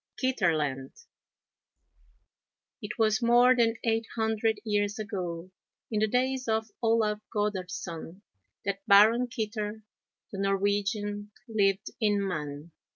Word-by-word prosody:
KITTERLAND 155 - 0 1.9
It 210 -1 -6
was 220 0 +2
more 240 +2 +5
than 230 -2 +3
eight 225 -1 0
hundred 220 -1 0
years 205 -1 0
ago, 185 -4 -5 0.4
in 215 - +1
the 215 - +3
days 255 +2 0
of 220 -1 0
Olaf 225 -2 +2
Goddardson, 185 -3 -4 0.4
that 195 0 -2
Baron 220 +5 +6
Kitter, 215 -2 -4 0.5
the 195 - -6
Norwegian, 205 +1 0 0.2
lived 200 -2 +1
in 205 -3 +1
Mann. 150 -2 -5
210 Hz, 105 wpm, -28 LUFS, 195-225 Hz, 1.9 s, Baron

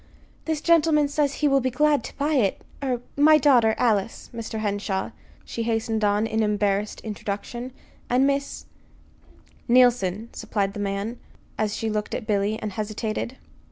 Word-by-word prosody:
"This 315 -2 -1
gentleman 315 -3 +4
says 285 -1 0
he - - +6
will 275 -1 +4
be 260 0 0
glad 295 +3 +2
to - - -9
buy 295 +2 0
it. 220 -9 +1 0.2
Er 250 -3 -1
my 305 +2 +6
daughter, 250 -6 +4
Alice, 220 -3 0
Mr. 230 -1 -5
Henshaw," 205 -2 -2 0.3
she 230 - -5
hastened 225 -1 -1
on, 205 +1 +2
in 220 0 0
embarrassed 205 -1 0
introduction; 220 +4 -5 0.4
"and 255 +2 +3
Miss 280 0 -1 0.5
" - - -29
"Neilson," 235 -4 +3
supplied 200 -2 -2
the 205 - -6
man, 205 +4 -3 0.4
as 215 -1 -1
she 225 0 -3
looked 210 -1 -2
at 230 - -5
Billy, 210 0 0
and 215 -2 -4
hesitated. 215 +4 -3
225 Hz, 155 wpm, -24 LUFS, 210-265 Hz, 0.5 s, he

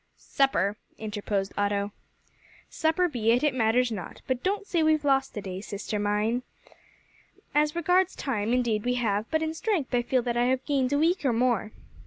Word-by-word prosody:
"Supper," 220 -7 +1 0.2
interposed 205 -2 -3
Otto. 205 0 0 0.8
"Supper 320 +3 +1
be 240 -8 -1
it; 245 - +1
it 295 -3 +3
matters 240 0 +2
not. 195 -5 -7
But 255 -1 -1
don't 400 +2 -1
say 345 -5 0
we've 310 -1 +2
lost 270 -3 +1
a - - -2
day, 185 0 -5
sister 210 +1 -4
mine. 210 +4 0 1.1
As 300 +1 +2
regards 360 +2 +2
time, 225 -5 -2
indeed, 235 -4 +1
we 245 0 0
have; 215 -3 -1
but 320 0 +1
in 315 0 -2
strength 325 - -1
I 245 - +3
feel 245 +1 0
that 240 -1 -1
I 240 - +3
have 260 +1 0
gained 270 -3 +1
a 285 - +2
week 330 +4 +2
or 260 -4 +2
more." 235 -2 +1
250 Hz, 185 wpm, -27 LUFS, 215-300 Hz, 1.1 s, it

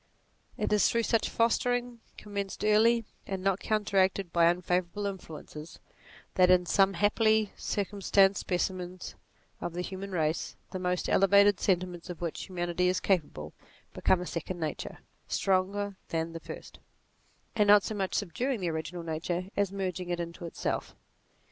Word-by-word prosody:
It - - 0
is 210 -3 +4
through 230 0 +1
such 225 -1 +1
fostering, 245 +1 +1 0.2
commenced 200 -2 -5
early, 225 +2 +4 0.2
and 190 -1 -4
not 195 0 +2
counteracted 195 -3 +1
by 170 -1 +5
unfavourable 180 +3 0
influences, 160 -5 -7 0.6
that, 180 -1 +5
in 180 -1 +5
some 195 +2 +3
happily 215 +2 +2
circumstanced 200 -1 +2
specimens 180 0 -3 0.5
of 175 - -4
the 180 +1 -3
human 195 +2 -6
race, 160 -3 -1 0.2
the 185 - -4
most 180 0 -1
elevated 200 0 +5
sentiments 180 -2 -1
of 175 - -6
which 170 -2 -4
humanity 175 -1 -1
is 185 0 +2
capable 145 - -1 0.4
become 185 -1 +2
a - - -4
second 175 +1 -4
nature, 155 -2 -4 0.3
stronger 195 +1 0
than 165 0 -2
the 165 - -5
first, - - -10 0.8
and 210 -2 +3
not 205 -1 +7
so - - -3
much 195 -3 -2
subduing 235 +7 -1
the 175 -3 -1
original 160 +2 -4
nature 170 +3 -3
as 200 -2 +1
merging 185 -2 -3
it 175 0 -1
into 170 0 -6
itself. - - -3
185 Hz, 150 wpm, -29 LUFS, 175-205 Hz, 0.8 s, not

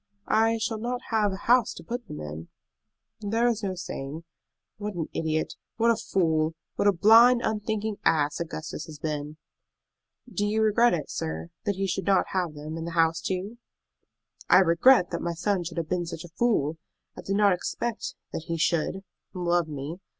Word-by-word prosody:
"I 225 +1 +3
shall 220 0 -2
not 245 +2 -2
have 215 -2 +2
a 190 - -7
house 245 -1 +4
to - - -10
put 240 0 -5
them 150 - -7
in." 75 +2 -7 0.7
"There 225 +3 +1
is 230 -2 0
no 195 -3 -2
saying. 155 -3 -6 0.5
What 210 -1 -5
an 165 -2 -3
idiot, 155 -1 -1 0.2
what 235 0 +4
a - - +3
fool, 160 -6 0 0.2
what - - +1
a - - +7
blind, 230 +6 +6
unthinking 215 0 -2
ass 145 -2 +2
Augustus 165 0 -5
has 155 -2 -9
been!" 150 0 -4 0.9
"Do 225 -4 -2
you 215 +1 +1
regret 220 0 +4
it, 155 - -5
sir, 80 +1 -4
that 205 - 0
he 195 +1 -1
should 195 0 -2
not 195 - +3
have 180 -5 -1
them 155 +2 -6
and 165 0 -5
the 170 - -5
house 165 0 +3
too?" 195 +5 -3 0.9
"I - - +8
regret 180 +4 +5
that 170 - -3
my 170 0 -2
son 185 +1 0
should 170 0 -7
have 165 -2 -2
been 175 -2 -1
such 165 - -6
a 175 - -10
fool! 165 -11 +1 0.4
I - - -8
did 195 - -2
not 205 -1 +5
expect 220 +5 -3 0.2
that 160 - -4
he 165 - -2
should 170 +3 0 0.3
love 175 -2 +1
me. 150 +2 -5
180 Hz, 185 wpm, -27 LUFS, 160-215 Hz, 0.9 s, I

